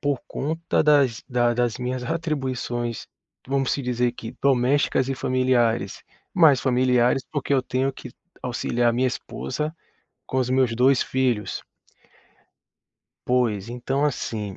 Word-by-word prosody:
por 140 -3 0
conta 160 +4 -1
das 140 -6 +3
da 120 -1 +2
das 120 -1 0
minhas 125 0 -3
atribuições, 130 -6 -3 0.4
vamos 135 0 0
se - - -1
dizer 125 -1 0
que 115 -2 -8
domésticas 135 0 +2
e 135 - -1
familiares. 125 -5 +1 0.3
Mais 155 -8 +6
familiares, 125 0 +2
porque 145 -2 -2
eu 130 - +2
tenho 130 +2 -1
que - - -10 0.3
auxiliar 120 -1 0
minha 130 +2 +1
esposa 140 - -4 0.5
com 130 - -1
os 125 - 0
meus 130 -3 +2
dois 130 +2 +4
filhos. 125 -5 -1 1.6
Pois 115 -5 +1
então, 130 +4 -1
assim, 110 -8 -3
125 Hz, 130 wpm, -24 LUFS, 120-135 Hz, 1.6 s, Mais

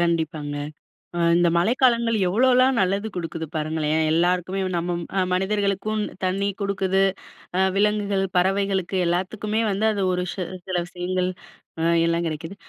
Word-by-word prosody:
கண்டிப்பாங்க. 160 -4 -1 0.6
அ - - -1 0.2
இந்த 175 0 +4
மழைக்காலங்கள் 235 +3 +3
எவ்வளோலாம் 255 +6 +4
நல்லது 195 +3 +1
குடுக்குது 165 -2 -4
பாருங்களேன். 155 0 0
எல்லாருக்குமே 180 +3 +1 0.2
நம்ம 175 +1 -1
ம் 185 +2 -2
மனிதர்களுக்கும் 200 +2 0 0.2
தண்ணி 190 +2 0
குடுக்குது. 195 -1 +1 0.6
அ - - +2 0.2
விலங்குகள், 205 -1 +1
பறவைகளுக்கு 190 0 +1
எல்லாத்துக்குமே 205 +5 -1
வந்து, 200 +3 0
அது 200 - -2
ஒரு 180 0 -1
சி 190 - -5 0.3
சில 185 - -2
விஷயங்கள், 180 0 -2 0.5
அ - - 0 0.2
எல்லாம் 170 0 0
கிடைக்குது. 165 +4 -5
185 Hz, 130 wpm, -23 LUFS, 170-200 Hz, 0.6 s, இந்த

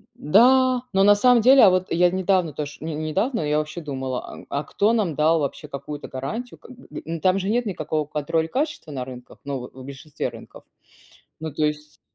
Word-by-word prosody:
Да. 255 - +4
Но 195 - +4
на 205 +1 +7
самом 245 +3 +4
деле, 260 +4 +7
а, 200 - +9
вот 185 0 0
я 175 +1 +4
недавно 185 -3 +1
тож 150 +1 -6
не 160 -1 -4
недавно 175 - -1
я 150 0 +1
вообще 155 +3 -5
думала, 130 -3 -4
а - - -10 0.2
а - - -4
кто 205 +9 +1
нам 195 -9 0
дал 160 +2 +3
вообще 150 +1 -4
какую-то 145 +1 -7
гарантию 220 - -6
как - - -15
бы, 255 0 -15 0.2
м? 165 0 -5
Там 185 +2 +3
же 195 +1 -3
нет 240 +2 +1
никакого 155 -6 -2
контроля 155 +2 -1
качества 295 - -3
на 130 -3 -4
рынках, 125 -1 -11
ну, 140 -1 -4
в 125 - -8
в 130 - -11
большинстве 140 +2 -5
рынков. - - -13 0.8
Ну, 160 -1 -5
то 155 +2 -1
есть 150 0 -4
160 Hz, 210 wpm, -23 LUFS, 150-205 Hz, 0.8 s, а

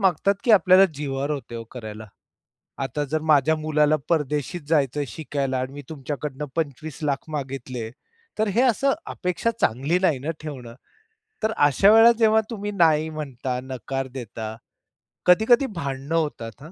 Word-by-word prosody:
मागतात 195 +1 +2
की 240 - +2
आपल्याला 190 -2 +7
जिवावर 140 0 -3
होते 140 -5 -5
हो 115 0 -5
करायला. 110 -3 -8 0.8
आता 135 +3 -2
जर 155 0 0
माझ्या 150 +2 +4
मुलाला 155 -1 +2
परदेशी 150 +1 0
जायचं 145 -2 +1
शिकायला 140 -4 -3
आणि 130 +1 -4
मी 145 +1 -8
तुमच्याकडनं 145 -1 -5
25,00,000 150 -2 -3
मागितले, 130 -5 -5 0.5
तर 215 0 +2
हे 240 - +4
असं 265 +2 +3
अपेक्षा 180 +4 -1
चांगली 135 +10 +1
नाही 165 -8 +3
ना 145 +5 -3
ठेवणं. 130 -6 -8 0.7
तर 220 - +2
अशा 145 +8 +5
वेळेला 225 +2 +8
जेव्हा 220 -1 +5
तुम्ही 205 -3 -4
नाही 160 -5 +3
म्हणता, 135 -5 -4
नकार 130 +1 -4
देता, 115 -4 -7 0.7
कधी-कधी 220 +8 +5
भांडणं 140 0 -3
होतात 145 -8 -2
हां, 155 +3 -11
150 Hz, 145 wpm, -24 LUFS, 135-170 Hz, 0.8 s, वेळेला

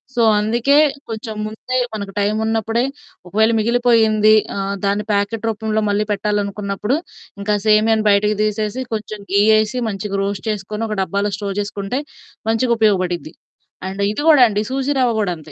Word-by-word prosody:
So 235 - +2 0.2
అందుకే 235 +7 +2 0.3
కొంచెం 220 0 -5
ముందే 250 +4 -4 0.2
మనకు 200 -2 -5
టైమున్నప్పుడే 220 +2 0 0.4
ఒకవేళ 220 +4 +2
మిగిలిపోయింది 220 -2 +4 0.2
ఆహ్, 200 0 -2
దాన్ని 200 +1 0
ప్యాకెట్ 205 +2 -1
రూపంలో 220 0 -1
మళ్ళీ 205 +1 +1
పెట్టాలనుకున్నప్పుడు 205 +2 -1 0.4
ఇంకా 210 +1 -1
సేమియాని 215 0 +3
బయటకి 210 +1 +3
తీసేసి 215 +3 -2
కొంచెం 215 -1 -5
ఘీ 200 +1 +4 0.2
ఏసి 220 +4 -1
మంచిగా 200 -1 -3
రోస్ట్ 200 +2 -4
చేసుకొని 210 +2 -3
ఒక 215 - -3
డబ్బాలో 200 +2 -1
స్టోర్ 200 -1 -4
చేసుకుంటే 205 +5 -4 0.5
మంచిగా 235 +2 +2
ఉపయోగపడిద్ది. 185 -6 0 0.5
అండ్ 195 +1 -5
ఇది 250 - -3
గూడా 295 -6 +7
అండి 210 -1 -1
సూజీ 270 +2 -1
రవ్వ 245 -2 +3
గూడా 200 -4 0
అంతే. 155 -1 -14
215 Hz, 145 wpm, -19 LUFS, 200-225 Hz, 0.5 s, గూడా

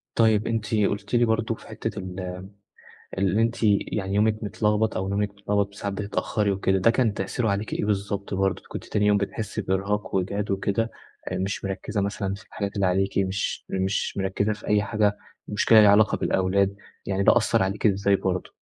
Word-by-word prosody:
طيب 110 -2 +3
أنتِ 115 -1 -1
قُلت 100 +1 0
لي 120 0 +4
برضه 110 0 0
في - - -16
حتة - - -5
ال 95 0 -6 1.0
اللي 100 +2 +2
أنتِ 115 +1 +1
يعني 100 -2 +1
يومِك 110 +1 +2
متلغبط 105 +1 0
أو 95 +1 -2
نومِك 100 +1 0
متغلبط 100 0 -1
وساعات 100 0 -5
بتتأخري 105 +1 -1
وكده، 95 0 +1
ده 115 +5 +4
كان 115 -3 +1
تأثيره 105 +4 -1
عليكِ 100 +2 -2
إيه - - -1
بالضبط؟ 100 -1 -2
برضه 95 -1 0
كنتِ - - -6
تاني 105 0 0
يوم 105 0 +4
بتحسّي 100 +1 -3
بإرهاق 100 +3 -1
وإجهاد 100 +2 -1
وكده، 100 +3 0 0.4
آآ، - - -1
مش 95 +1 -3
مركّزة 100 +2 -2
مثلًا 100 -1 -2
في 100 - -14
الحاجات 100 -1 -5
اللي 100 -2 +1
عليكِ، 95 +2 0
مش 95 0 -1
مش 95 +1 -1
مركّزة 100 +2 0
في 105 - -11
أي 105 -1 +3
حاجة، 105 0 +1 0.3
مُشْكلة 110 +2 +5
ليها 105 - +7
علاقة 105 +2 +4
بالأولاد، 95 +1 +1 0.3
يعني 100 0 0
ده - - +6
أثّر - - +2
عليكِ 95 +4 -2
إزاي 100 0 +2
برضه؟ 95 -1 -2
100 Hz, 185 wpm, -25 LUFS, 95-105 Hz, 1.0 s, ليها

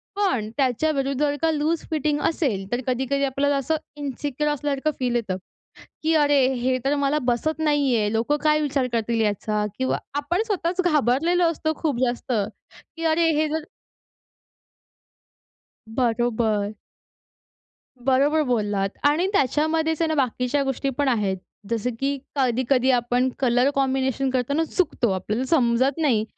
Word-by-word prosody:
पण 360 - 0
त्याच्याविरुद्ध 275 +1 0
जर 290 -1 +1
का 325 - +3
लूज 310 +2 0
फिटिंग 300 -1 0
असेल, 255 - -1
तर 245 +1 0
कधी-कधी 265 +2 0
आपल्याला 280 +1 +1
असं 275 +4 0 0.2
इन्सिक्युअर 290 +1 -2
असल्यासारखं 290 +1 -1
फील 245 -2 0
येतं, 210 -6 -1 0.7
की 325 +1 +2
अरे! 290 -2 +4 0.2
हे 255 +1 0
तर 285 +2 +2
मला 285 +1 +1
बसत 310 +7 -1
नाहीये, 275 -9 +2
लोकं 235 +7 +1
काय 305 0 +4
विचार 275 -3 0
करतील 230 0 0
याचा 210 0 0
किंवा 260 - +1 0.2
आपण 345 +8 0
स्वतःच 370 -3 0
घाबरलेलो 325 +2 +2
असतो 315 -1 -2
खूप 290 -7 0
जास्त, 240 +1 -3
की 225 +9 -5
अरे! 325 +1 +3
हे 310 0 +2
जर 315 0 -2 2.3
बरोबर. 225 -4 0 1.3
बरोबर 280 +4 +3
बोललात 205 -4 0 0.2
आणि 310 +5 +2
त्याच्यामध्येच 315 +2 +1
आहे 330 - +2
ना 315 - 0
बाकीच्या 260 +1 0
गोष्टी 270 +1 -1
पण 285 - +1
आहेत. 210 -6 +1 0.3
जसं 230 +1 -1
की 280 +1 0 0.2
कधी-कधी 260 0 +2
आपण 245 +1 +1
कलर 250 +1 +3
कॉम्बिनेशन 265 -1 0
करताना 260 +5 0
चुकतो 315 - 0
आपल्याला 210 +7 -2
समजत 260 -2 +2
नाही, 240 -9 +2
270 Hz, 135 wpm, -23 LUFS, 240-300 Hz, 2.3 s, अरे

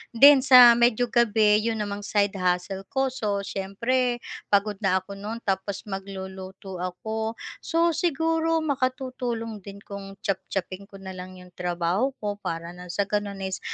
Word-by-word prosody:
Then, 280 +4 +9
sa 255 -2 +9
medyo 240 0 +3
gabi, 215 -3 +4
yun 225 +1 -1
namang 205 0 -5
side 200 -1 +1
hustle 185 +2 -1
ko. 265 +2 0
So, 205 -5 -2
siyempre 240 +6 -1 0.2
pagod 200 0 +1
na 195 -3 +2
ako 200 +1 -9
no'n 220 +3 -6
tapos 195 0 -2
magluluto 190 -1 -7
ako. 220 +5 -3 0.2
So 335 +1 +1
siguro 325 0 +1
makatutulong 255 -5 -2
din 200 +1 -11
kung 195 -1 -8
chop-chopin 190 0 -3
ko 200 - -15
na 190 - -6
lang 185 0 -9
yung 180 0 -14
trabaho 180 +8 -1
ko 205 -1 -3
para 170 -3 -4
ng 180 0 -11
sa 190 +3 0
gano'n 200 -1 -3
is 190 0 -3
205 Hz, 155 wpm, -25 LUFS, 190-240 Hz, 0.2 s, Then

